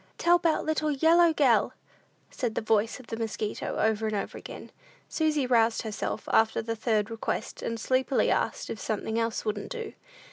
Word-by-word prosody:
"Tell 345 +1 +4
'bout 330 -2 +1
little 310 -1 0
yellow 325 +4 +5
gell," 255 -9 +3 0.6
said 240 -4 -3
the - - 0
voice 220 +1 +1
of 255 - -13
the 225 - -5
mosquito, 220 -2 -3
over 220 0 +1
and 215 - -2
over 200 - -3
again. - - -9 0.4
Susy 305 -4 0
roused 230 -2 +2
herself 215 -1 -4
after 220 0 +3
the 230 0 -3
third 220 -1 0
request, 225 0 -4
and 230 0 -3
sleepily 260 +3 +1
asked - - -1
if 220 - -5
something 220 +1 -2
else 230 -1 -2
wouldn't 210 -1 -3
do? 465 -2 -6
230 Hz, 175 wpm, -28 LUFS, 220-300 Hz, 0.6 s, yellow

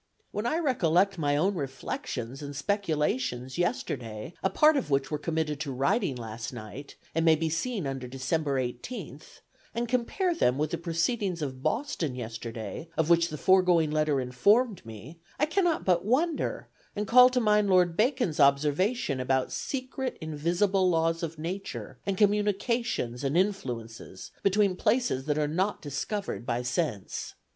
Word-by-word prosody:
"When 210 +3 -2
I 310 - +1
recollect 195 - +2
my 145 -2 +1
own 190 +7 +2
reflections 135 - -5
and 145 -1 -6
speculations 160 - -1
yesterday, 125 - -2
a 190 - +2
part 305 +7 +5
of 270 - -1
which 135 0 +1
were 150 - -1
committed 155 -1 -2
to 150 -3 -3
writing 135 - +1
last 115 0 -6
night, 120 +4 -9 0.2
and 165 - +1
may 160 -1 +6
be 160 +1 -1
seen 200 - -2
under 135 -2 -4
December 135 +2 -1
18th, 135 - -6 0.3
and 235 +1 -1
compare 255 - 0
them 125 - +2
with 150 +1 -1
the 170 - -2
proceedings 170 +1 -1
of 130 -2 -5
Boston 170 - -1
yesterday, 115 +4 -6
of 160 +1 +2
which 170 0 +4
the 155 - -5
foregoing 180 -3 +4
letter 150 -2 +1
informed 200 - +2
me, 115 +9 -11 0.2
I 300 - +3
cannot 340 +1 +1
but 175 -2 +3
wonder, 295 - 0 0.3
and 210 - -1
call 250 +4 +8
to 255 0 +1
mind 210 -3 +3
Lord 180 -2 +4
Bacon's 235 - +1
observation 145 - +2
about 130 0 0
secret 260 0 -4
invisible 175 +5 +1
laws 165 -1 +1
of 165 -1 -4
nature, 180 +5 -6
and 195 -1 0
communications 205 - +1
and 140 +4 +1
influences 125 - -3
between 200 -1 +3
places 215 - +1
that 150 -1 0
are 150 -1 +1
not 185 +7 0
discovered 150 - -4
by 120 0 -2
sense. 125 - -3
165 Hz, 155 wpm, -28 LUFS, 135-205 Hz, 0.3 s, call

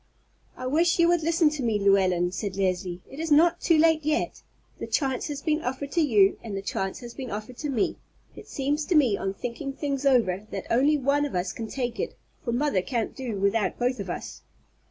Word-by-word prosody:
"I 255 - -6
wish 330 +6 +2
you 340 -1 +5
would 345 -1 +3
listen 325 -1 +3
to 300 -2 -4
me, 225 -4 +1
Llewellyn," 190 -3 +3
said 195 0 -4
Leslie; 180 -2 -1
"it 275 - -11
is 325 -1 -3
not 335 +3 +5
too 330 - +4
late 320 0 +4
yet. 310 +2 -1 0.4
The - - -5
chance 265 -4 0
has 290 -2 -5
been 310 0 +1
offered 265 +2 -4
to 335 - +2
you 210 -10 +4
and 210 -4 -5
the 195 - -5
chance 195 +1 -3
has 240 -1 -8
been 260 -3 -6
offered 215 +4 -6
to 300 - -4
me. 240 -7 0 0.4
It - - -12
seems 290 +2 -1
to 350 - 0
me, 260 -9 +4
on 195 0 -3
thinking 245 +6 -5
things 280 -1 -3
over, 215 -8 +2
that - - -5
only 280 +6 +4
one 280 +1 +1
of 290 - -3
us 180 0 -1
can 225 - -5
take 245 0 -3
it, - - -3 0.3
for 235 - -2
mother 245 -5 +1
can't 230 +3 -3
do 245 -7 -4
without 200 +2 +1
both 250 +1 0
of - - -5
us." - - -6
255 Hz, 220 wpm, -26 LUFS, 205-295 Hz, 0.4 s, you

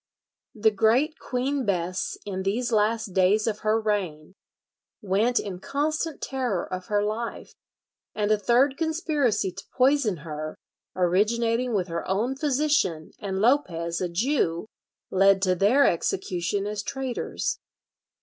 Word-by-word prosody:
The 220 0 +3
great 230 +9 +2
Queen 265 +2 -1
Bess 185 -3 -1
in 190 -2 -3
these 225 +6 -1
last 215 -1 +1
days 190 +3 +3
of 215 -2 -1
her 215 +1 +1
reign 185 -7 -2 0.7
went 215 +4 +1
in 190 -3 -5
constant 305 - -2
terror 250 -9 -1
of 185 -1 -6
her 205 -1 +1
life; 220 +3 -4 0.6
and 210 0 0
a 215 - +4
third 255 +6 +3
conspiracy 310 - 0
to 195 +2 -10
poison 255 -7 +3
her, 155 0 -5 0.4
originating 225 +6 +1
with 185 -2 0
her 170 -1 -3
own 225 +8 0
physician 280 - 0
and 195 -2 -3
Lopez, 175 - +1
a 180 - -1
Jew, 170 - 0 0.5
led 195 +1 +5
to 185 -2 +3
their 210 +10 +4
execution 180 +2 -1
as 210 0 -3
traitors. 260 +2 -3
210 Hz, 130 wpm, -26 LUFS, 185-250 Hz, 0.7 s, led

